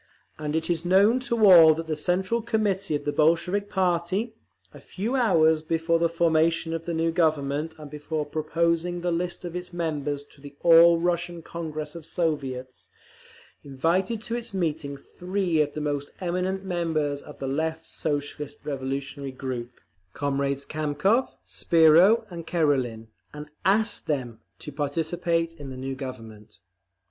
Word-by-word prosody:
And 150 0 -3
it 160 0 0
is 170 -2 -1
known 200 +7 +4
to 230 -2 +3
all 165 -5 +9
that 165 +1 -5
the 160 -1 -2
Central 185 +8 0
Committee 205 -7 0
of 145 - -4
the 145 - 0
Bolshevik 180 +6 +2
party, 185 +4 0 0.4
a - - -12
few 220 +8 -4
hours 160 -10 +4
before 165 +1 0
the 170 0 +2
formation 165 0 +1
of 165 0 -4
the 170 - -3
new 165 +1 +1
Government 155 -2 0
and 150 -1 -9
before 150 +1 -3
proposing 170 +3 -1
the 175 0 -1
list 175 +1 -2
of 175 0 -6
its 180 0 -5
members 150 -4 -2
to 140 - -20
the 140 0 -11
All 170 0 +7
Russian 175 0 -1
Congress 155 -3 -6
of 165 -2 -9
Soviets, 135 -6 -3 0.7
invited 175 - -1
to 230 - -5
its 235 -4 -5
meeting 155 -5 -2
three 180 +2 -1
of 145 -1 -1
the 150 - -4
most 145 -1 -2
eminent 185 +2 -2
members 160 -5 -1
of 150 - -12
the 135 - -5
Left 160 +4 -2
Socialist 145 -1 -4
Revolutionary 135 0 -4
group, 130 -2 -5 0.5
comrades 140 -1 -1
Kamkov, 155 - +1 0.2
Spiro 170 +8 +5
and 170 -2 -8
Karelin, 130 -9 0 0.3
and 150 0 -8 0.2
ASKED 215 +3 +1
THEM 125 -7 -2 0.2
to - - -9
participate 165 +3 -1
in 140 -2 -7
the 130 - -8
new 135 +1 -4
Government. 115 -5 -9
160 Hz, 155 wpm, -26 LUFS, 145-175 Hz, 0.7 s, all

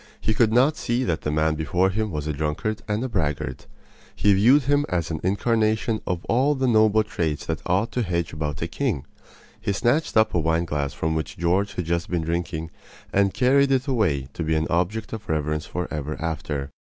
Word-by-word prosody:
He 110 - 0
could 110 0 +3
not 130 +7 +4
see 120 +2 0
that 80 -10 -1
the - - -2
man 80 +1 +2
before 85 +5 +1
him 110 +2 -1
was 75 -5 -4
a 75 - -1
drunkard 80 +9 -2
and 110 +4 -2
braggart. 75 -8 -2 0.5
He 105 - +4
viewed 125 +9 +5
him 145 +2 +2
as 85 -3 -1
an 80 - -2
incarnation 110 +3 +1
of 90 -1 -2
all 135 +5 +2
the 130 -1 0
noble 110 -2 +4
traits 80 -8 -2
that - - -3
ought 95 +6 +1
to 125 - -1
hedge 85 -5 -2
about 75 -1 -3
a - - -1
king. 90 - -2 0.6
He 110 -2 -1
snatched 120 +7 +1
up 110 - +4
a 85 - +2
wine 80 +1 +1
glass 70 -3 -2
from 80 0 -1
which 80 -1 -3
George 95 +4 +1
had 90 - -2
just 85 +1 -1
been 85 -2 -1
drinking 80 -1 -3 0.4
and 100 0 +3
carried 135 +4 +3
it 130 -1 +2
away 80 - 0
to - - -5
be 80 0 +1
an 80 0 +1
object 95 +6 -1
of 110 -1 -7
reverence 75 -1 -1
for 90 0 -3
ever 75 0 -4
after. 75 -4 -3
90 Hz, 205 wpm, -24 LUFS, 80-110 Hz, 0.6 s, viewed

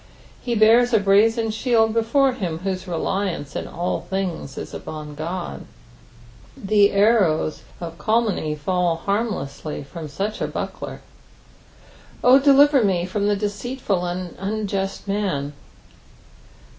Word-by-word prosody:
He 240 -2 -2
bears 230 +3 +5
a - - +5
brazen 220 +3 +3
shield 225 -1 +2
before 245 +4 +3
him 180 -10 -3
whose 190 -1 -3
reliance 175 -3 -2
in - - -3
all 175 +1 -2
things 185 -8 -4
is - - -7
upon 155 -1 -7
his 145 - -11
Qod; 155 - -4 1.0
the 205 0 +3
arrows 200 -7 +2 0.2
of 170 -1 -7
calumny 215 -9 0
fall 175 +2 0
harmlessly 165 -7 -3
from 155 +3 -8
aach 200 +9 -4
a - - 0
buckler. - - -6 1.2
"0 255 +2 +7
delirer 280 -1 +5
me 180 -4 +1
Jh»n 200 +2 -1
the 205 - +2
deceUful 205 -3 -2
and 180 0 -5
unjust 195 -1 -3
man." 185 -9 -1
195 Hz, 125 wpm, -22 LUFS, 170-220 Hz, 1.2 s, 0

